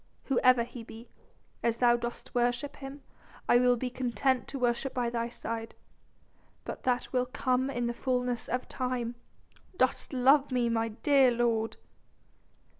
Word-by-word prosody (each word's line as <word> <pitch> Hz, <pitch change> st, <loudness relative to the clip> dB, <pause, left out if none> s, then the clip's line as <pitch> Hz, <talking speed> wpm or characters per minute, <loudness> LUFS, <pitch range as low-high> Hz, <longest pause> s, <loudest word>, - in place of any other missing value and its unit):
Whoever 255 Hz, -2 st, +4 dB
he 235 Hz, 0 st, -9 dB
be, 225 Hz, +1 st, -12 dB, 0.5 s
as 230 Hz, -1 st, +1 dB
thou 240 Hz, -1 st, +5 dB
dost 240 Hz, +1 st, -6 dB
worship 245 Hz, +4 st, 0 dB
him, 275 Hz, +1 st, -9 dB, 0.4 s
I 240 Hz, -, +6 dB
will 250 Hz, 0 st, +4 dB
be 250 Hz, +1 st, -3 dB
content 250 Hz, +1 st, 0 dB
to 275 Hz, -, -5 dB
worship 245 Hz, +1 st, 0 dB
by 240 Hz, -2 st, 0 dB
thy 235 Hz, 0 st, -2 dB
side. 225 Hz, -1 st, -5 dB, 0.9 s
But -, -, -6 dB
that 250 Hz, 0 st, 0 dB
will 250 Hz, 0 st, +1 dB
come 255 Hz, +1 st, 0 dB
in 245 Hz, -3 st, -2 dB
the 235 Hz, -, -1 dB
fullness 250 Hz, -1 st, -1 dB
of 250 Hz, +1 st, -2 dB
time. 250 Hz, -2 st, -2 dB, 0.6 s
Dost 255 Hz, 0 st, +1 dB
love 270 Hz, +2 st, +4 dB
me, 245 Hz, -2 st, +1 dB
my 225 Hz, 0 st, +1 dB
dear 265 Hz, +4 st, +4 dB
lord?" 230 Hz, -2 st, 0 dB
245 Hz, 150 wpm, -30 LUFS, 235-255 Hz, 0.9 s, I